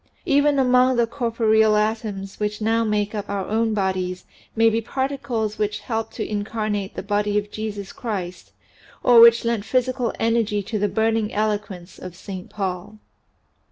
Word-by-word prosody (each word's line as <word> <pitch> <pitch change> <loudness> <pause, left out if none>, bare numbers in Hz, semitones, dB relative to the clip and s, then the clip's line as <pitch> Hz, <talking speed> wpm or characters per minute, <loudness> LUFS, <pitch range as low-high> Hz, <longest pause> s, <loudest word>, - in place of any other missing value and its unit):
Even 285 0 +3
among 255 -1 +4
the 235 -1 +3
corporeal 225 -3 +2
atoms 210 -2 -2
which 210 0 -2
now 225 +1 +1
make 210 -1 -1
up 205 -1 -5
our 200 -2 -2
own 220 0 0
bodies 185 -2 -2 0.3
may 225 0 +4
be 225 0 +2
particles 255 -4 -3
which 210 0 -1
helped 225 -2 -4
to - - -3
incarnate 210 -1 -3
the - - -5
person 205 0 0
of 205 0 -2
Jesus 205 -2 -5
Christ 185 -7 -5 0.5
or 240 -2 +7
which 235 0 +7
lent 230 -3 0
physical 255 +1 0
energy 225 -3 +1
to 215 +2 -3
the 205 0 +1
burning 220 -1 0
eloquence 205 -4 -3
of 180 -1 -9
Saint 185 0 -8
Paul. 190 +1 -4
215 Hz, 155 wpm, -22 LUFS, 205-230 Hz, 0.5 s, or